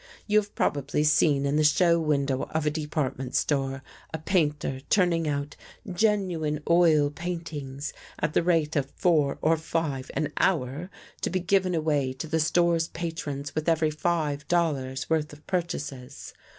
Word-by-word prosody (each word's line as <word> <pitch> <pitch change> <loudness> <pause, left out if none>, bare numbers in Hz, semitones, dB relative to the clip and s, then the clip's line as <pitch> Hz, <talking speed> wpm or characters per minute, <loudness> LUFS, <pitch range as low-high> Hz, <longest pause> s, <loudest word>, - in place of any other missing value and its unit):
You 210 0 +4
have 205 0 -7
probably 145 +1 0
seen 150 -2 +3
in 140 +1 +1
the 155 - +3
show 170 +3 +4
window 140 -4 0
of 160 -1 +1
a 150 - +2
department 150 -4 -3
store, 135 -2 0 0.3
a 160 - -3
painter 150 -5 0
turning 170 -4 +2
out 140 0 -2 0.2
" - - -37
genuine 175 -7 +1
oil 160 -4 +4
paintings 150 -4 -5
" - - -20
at 150 0 -1
the - - +3
rate 165 -3 +1
of 140 -2 0
four 155 -6 +2
or 160 +1 +4
five 155 -4 -2
an 155 0 -1
hour, 155 0 0 0.3
to - - 0
be 185 - 0
given 185 0 +1
away 150 -5 0
to 130 +4 -6
the 160 +1 0
store's 165 +1 +2
patrons 150 -5 -5
with 155 +1 -1
every 160 -1 +2
five 150 -3 -1
dollars' 140 -7 0
worth 155 -2 0
of 150 +1 -15
purchases. 145 -7 -4
155 Hz, 165 wpm, -27 LUFS, 145-170 Hz, 0.3 s, You